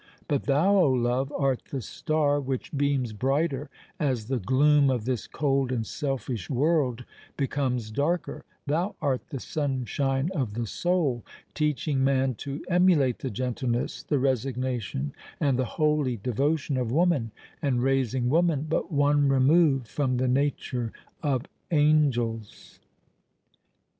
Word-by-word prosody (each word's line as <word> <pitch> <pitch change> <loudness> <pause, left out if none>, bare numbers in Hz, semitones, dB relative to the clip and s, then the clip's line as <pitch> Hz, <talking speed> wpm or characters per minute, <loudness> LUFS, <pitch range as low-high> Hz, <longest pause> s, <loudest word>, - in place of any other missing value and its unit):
But 145 -4 0
thou, 165 +9 +3
O 175 -7 +5
Love! 125 +2 0
art 135 -3 0
the 135 - -3
star 145 +3 0
which 135 +2 -4
beams 140 -5 0
brighter 135 +4 0 0.3
as 130 -8 -1
the 130 -2 0
gloom 140 +5 +4
of 125 -4 -1
this 125 -4 -2
cold 135 -3 0
and 115 -3 -1
selfish 125 - -3
world 130 -3 +1 0.3
becomes 130 -5 -1
darker:—thou 165 - -2
art 130 -3 0
the 135 - -5
sunshine 135 +1 -1
of 130 - -2
the 120 0 -2
soul—teaching 150 - -1
man 135 -1 +2
to 140 +5 -6
emulate 175 -8 +3
the 135 - -3
gentleness, 125 +1 -2
the 145 - 0
resignation, 125 - -1 0.3
and 135 -4 +1
the 130 - +1
holy 150 -6 +2
devotion 140 +6 0
of 125 -3 -1
woman—and 140 -4 0
raising 130 -2 +1
woman 160 0 +2
but 160 - -1
one 145 -1 +3
remove 135 0 +4
from 130 +2 -1
the 130 +1 +1
nature 125 -3 -1 0.3
of 140 -3 0 0.2
angels! 140 -8 +1
135 Hz, 125 wpm, -27 LUFS, 125-145 Hz, 0.3 s, O